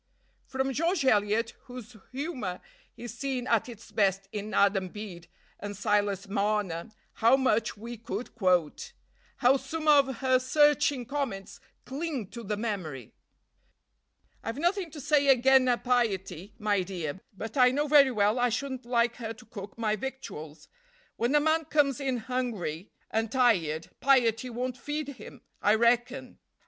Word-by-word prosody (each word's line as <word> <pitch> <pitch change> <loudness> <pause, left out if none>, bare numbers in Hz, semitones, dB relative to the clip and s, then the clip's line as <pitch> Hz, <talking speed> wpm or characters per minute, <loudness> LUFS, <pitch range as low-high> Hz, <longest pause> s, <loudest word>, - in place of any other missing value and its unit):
From 265 0 -1
George 330 +2 0
Eliot, 215 -1 +2
whose 245 -2 -10 0.2
humor 255 - -4 0.4
is 240 -1 -7
seen 260 -1 -3
at 230 0 +1
its 230 -2 -12
best 195 -2 +1
in 210 0 -5
"Adam 195 -2 +2
Bede" 180 -4 -9 0.3
and 205 -1 -6
"Silas 205 -1 0
Marner," 200 -3 -1 0.3
how 235 +4 +6
much 230 -5 +1
we 235 +3 -7
could 225 +2 -6
quote! 185 - 0 0.5
How 265 +2 +6
some 310 +4 -5
of 280 -3 +5
her 260 0 +3
searching 290 -1 +3
comments 240 -7 -4 0.3
cling 275 - -4
to 235 - -7
the 210 -1 -3
memory! 180 - -4 1.3
"I've 225 +2 -4
nothing 350 +3 0
to 300 0 -10
say 285 0 +2
again' 265 0 +5
her 245 -1 +3
piety, 205 -6 -1
my 210 -3 +1
dear; 180 -3 -5 0.2
but 225 +6 -6
I 250 -2 +6
know 285 +4 0
very 285 -2 +6
well 215 0 +2
I 245 0 +3
shouldn't 260 +1 -4
like 240 -1 +1
her 225 -2 -5
to 225 +2 -16
cook 205 -2 -9
my 215 -2 0
victuals. 165 - -7 0.5
When 240 +5 0
a - - +6
man 315 +1 +1
comes 285 -3 +2
in 265 -3 -1
hungry 220 -8 -3 0.2
and 225 0 -1
tired, 180 - +1
piety 250 -3 +3
won't 250 +1 -4
feed 295 +1 -4
him, 245 -7 -11 0.2
I 210 +1 +4
reckon. 245 +3 +1
235 Hz, 150 wpm, -28 LUFS, 205-265 Hz, 1.3 s, how